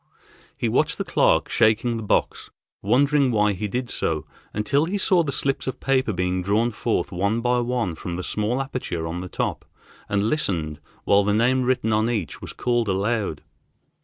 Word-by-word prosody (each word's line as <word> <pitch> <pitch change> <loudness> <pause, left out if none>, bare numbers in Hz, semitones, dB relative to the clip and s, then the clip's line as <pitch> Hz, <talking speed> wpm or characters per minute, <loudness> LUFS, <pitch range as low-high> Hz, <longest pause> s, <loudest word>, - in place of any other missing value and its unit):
He - - -1
watched - - +1
the - - -1
clerk - - +2
shaking 115 +2 +2
the - - -4
box, 105 - 0 0.3
wondering 140 +1 +3
why 105 -3 +2
he 105 +3 -3
did 125 +4 -3
so, 75 -2 -1 0.3
until 140 +8 +1
he 190 +5 -2
saw 185 -2 +4
the 150 -4 -2
slips 135 0 0
of 130 - -3
paper 130 -3 +1
being 90 -1 -1
drawn 105 +6 +1
forth 115 0 -1
one 100 +5 0
by 125 +1 +1
one 120 -7 -1
from 85 +2 -6
the 90 - -4
small 105 +7 -1
aperture 125 -11 -4
on 85 +2 -4
the 90 - -7
top, - - -2 0.5
and 100 0 +1
listened 90 - -1 0.2
while 100 0 +4
the 105 +1 +1
name 125 +4 +3
written 125 -3 +1
on 110 +2 +2
each 105 -10 -3
was - - -6
called 120 -2 0
aloud. 100 -2 -1
110 Hz, 185 wpm, -23 LUFS, 100-125 Hz, 0.5 s, saw